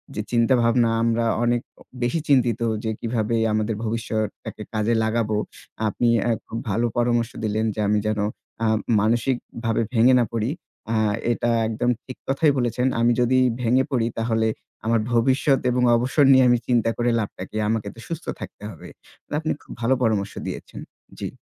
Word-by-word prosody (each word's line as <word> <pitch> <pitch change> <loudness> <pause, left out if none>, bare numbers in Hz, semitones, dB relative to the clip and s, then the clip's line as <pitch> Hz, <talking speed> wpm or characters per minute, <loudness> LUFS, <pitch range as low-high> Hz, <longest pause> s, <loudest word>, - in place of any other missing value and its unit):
যে - - -1
চিন্তাভাবনা 120 0 +3
আমরা 115 0 +1 0.2
অনেক 120 0 +2 0.2
অ - - -13 0.2
বেশি 125 +7 +1
চিন্তিত 125 -5 +3 0.2
যে 110 - -1
কিভাবে 115 -1 -1 0.2
আমাদের 110 +1 0
ভবিষ্যতটাকে 110 -1 -3
কাজে 110 +2 +1
লাগাবো। 110 -1 0 0.5
আপনি 120 +3 +1
অ্যা 120 - +1 0.2
খুব 115 - -5
ভালো 115 +4 +1
পরামর্শ 120 -1 +1
দিলেন 110 +1 0
যে - - -6
আমি 105 0 +2
যেন 110 -1 0 0.4
অ্যা 115 - +1 0.3
মানসিকভাবে 115 0 0
ভেঙে 120 +3 +5
না 120 - +3
পড়ি। 115 +2 -1 0.4
অ্যা 115 - +1 0.3
এটা 120 0 0 0.2
একদম 115 +2 -1
ঠিক 130 - -9
কথাই 145 +3 +3
বলেছেন। 125 +1 0
আমি 120 +1 +4
যদি 130 +2 +3 0.2
ভেঙে 125 +3 +3
পড়ি 115 -3 +1
তাহলে 110 -1 +1 0.4
আমার 115 0 +2
ভবিষ্যৎ 130 +3 +3
এবং 125 0 +1
অবসর 130 +5 +2
নিয়ে 130 -1 +6
আমি 120 - +5
চিন্তা 120 -2 +2
করে 120 0 +1
লাভটা 100 -3 -4
কি 110 - -6
আমাকে 110 -2 -1
তো - - -13
সুস্থ 165 0 -5
থাকতে - - -9
হবে। 85 - -11 0.4
তো - - -32
আপনি 155 0 -2
খুব - - -15
ভালো 120 +3 +3
পরামর্শ 105 -4 0
দিয়েছেন। - - -7 0.4
জি। - - -3
115 Hz, 170 wpm, -23 LUFS, 110-125 Hz, 0.5 s, নিয়ে